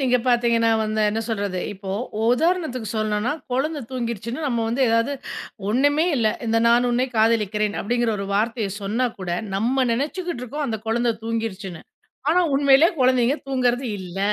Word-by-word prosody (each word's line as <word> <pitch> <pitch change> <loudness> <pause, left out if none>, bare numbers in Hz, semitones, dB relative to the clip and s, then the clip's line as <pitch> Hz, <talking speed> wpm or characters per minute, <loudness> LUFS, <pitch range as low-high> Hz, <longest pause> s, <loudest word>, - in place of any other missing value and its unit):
நீங்க 250 -2 +3
பார்த்தீங்கன்னா 235 -1 +3
வந்து, 215 0 -1
என்ன 220 +1 -1
சொல்றது. 200 -4 -2
இப்போ 190 0 -7 0.3
உதாரணத்துக்கு 255 - +1
சொல்லணும்னா, 215 +4 0 0.2
குழந்த 290 +4 -1
தூங்கிருச்சுன்னு 235 +1 -4
நம்ம 235 -3 0
வந்து 255 +4 0
ஏதாவது 230 +5 +2 0.6
ஒன்னுமே 290 +8 +3
இல்ல. 225 -3 +2 0.2
இந்த 225 0 +2
"நான் 240 +1 +4
உன்னை 250 +2 +1
காதலிக்கிறேன்." 215 -2 +2
அப்பிடிங்கிற 240 +1 0
ஒரு 195 - -4
வார்த்தைய 220 0 0
சொன்னாகூட 205 -4 -2 0.2
நம்ம 255 +5 +1
நெனச்சிக்கிடடு 300 +2 -3
இருக்கோம், 285 +4 -3
அந்த 220 -3 -2
குழந்த 235 +1 +1
தூங்கிருச்சுன்னு. 210 -6 -4 0.5
ஆனா 360 +2 +4
உண்மையிலயே 280 +3 +5
குழந்தைங்க 255 +1 +3
தூங்குறது 250 -1 +1
இல்ல! 185 0 -7
235 Hz, 140 wpm, -23 LUFS, 215-260 Hz, 0.6 s, உண்மையிலயே